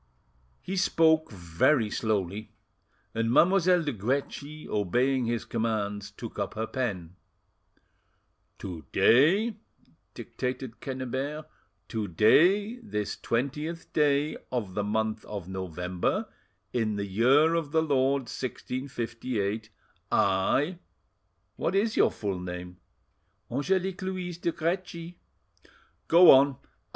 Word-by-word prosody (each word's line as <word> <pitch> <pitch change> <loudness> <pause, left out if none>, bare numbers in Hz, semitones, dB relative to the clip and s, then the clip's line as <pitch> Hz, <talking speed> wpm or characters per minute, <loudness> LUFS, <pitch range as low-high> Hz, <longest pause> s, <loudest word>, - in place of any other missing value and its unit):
He 190 +1 -4
spoke 160 -4 +3
very 100 - +1
slowly, 105 -1 -2 0.6
and 115 +1 0
Mademoiselle 180 +3 +4
de 145 -3 -2
Guerchi, 140 +7 -3
obeying 125 +6 +1
his 115 0 -2
commands, 105 -3 -2
took 105 +2 -9
up 100 +1 -3
her 110 +1 -1
pen. 95 -9 -4 1.4
"'To 85 -5 -7
day,'" 195 - +4 0.6
dictated 125 -1 -5
Quennebert,—"'to 130 -4 -5
day, 180 - +4
this 105 - -3
twentieth 150 +7 -3
day 150 0 +2
of 110 -7 -3
the 105 - -1
month 110 +1 -1
of 100 -4 -6
November, 90 -1 -2 0.5
in 110 -3 0
the 100 0 -2
year 130 - +4
of 165 -4 -1
the 160 0 +3
Lord 140 -2 +2
1658, 120 -4 -4 0.4
I— 130 - +2 0.8
"What 185 - -1
is 215 +3 +1
your - - +5
full 100 -4 -4
name?" 90 0 -7 0.7
"Angelique 185 +8 -1
Louise 185 -2 -4
de 170 - 0
Guerchi." 170 0 -3 0.9
"Go 175 +2 +8
on! 135 0 +5
125 Hz, 105 wpm, -28 LUFS, 105-160 Hz, 1.4 s, Go